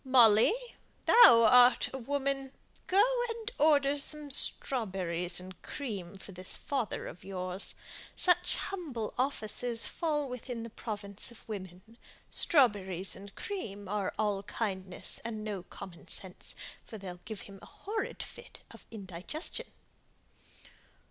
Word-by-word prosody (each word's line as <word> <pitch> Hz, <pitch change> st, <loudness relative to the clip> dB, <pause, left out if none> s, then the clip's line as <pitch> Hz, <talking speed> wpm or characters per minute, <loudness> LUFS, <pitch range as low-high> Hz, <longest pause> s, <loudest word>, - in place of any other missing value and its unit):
Molly, 240 Hz, -, +6 dB, 0.5 s
thou 345 Hz, -, +9 dB
art 250 Hz, +2 st, +6 dB
a 265 Hz, -, -3 dB
woman! 275 Hz, +1 st, -2 dB, 0.3 s
Go 390 Hz, +2 st, +6 dB, 0.3 s
and 455 Hz, +1 st, -4 dB
order 290 Hz, -2 st, +4 dB
some 295 Hz, 0 st, -1 dB
strawberries 185 Hz, -, 0 dB
and 185 Hz, 0 st, -11 dB
cream 200 Hz, -10 st, -5 dB
for 195 Hz, +1 st, -8 dB
this 185 Hz, 0 st, -3 dB
father 265 Hz, -7 st, -2 dB
of -, -, -9 dB
yours. 185 Hz, 0 st, -3 dB, 0.4 s
Such 360 Hz, -1 st, +3 dB
humble 290 Hz, -, -3 dB
offices 245 Hz, -2 st, -1 dB
fall 300 Hz, -4 st, -1 dB
within 250 Hz, -2 st, -5 dB
the 230 Hz, -, -7 dB
province 205 Hz, -1 st, -4 dB
of 235 Hz, -, -16 dB
women. 200 Hz, +2 st, -8 dB, 0.3 s
Strawberries 195 Hz, -, +3 dB
and 200 Hz, 0 st, -11 dB
cream 205 Hz, -, -5 dB
are 200 Hz, -1 st, -1 dB
all 205 Hz, -2 st, +1 dB
kindness 195 Hz, -3 st, -4 dB
and 220 Hz, -2 st, -4 dB
no 205 Hz, -3 st, -3 dB
common 175 Hz, -1 st, -11 dB
sense, 185 Hz, -2 st, -4 dB, 0.3 s
for 220 Hz, -, -9 dB
they'll 185 Hz, -3 st, -7 dB
give 215 Hz, -1 st, -6 dB
him 195 Hz, -1 st, -11 dB
a -, -, -12 dB
horrid 425 Hz, +2 st, -4 dB
fit -, -, -11 dB
of -, -, -13 dB
indigestion." 220 Hz, -, -3 dB
220 Hz, 130 wpm, -32 LUFS, 195-275 Hz, 0.5 s, thou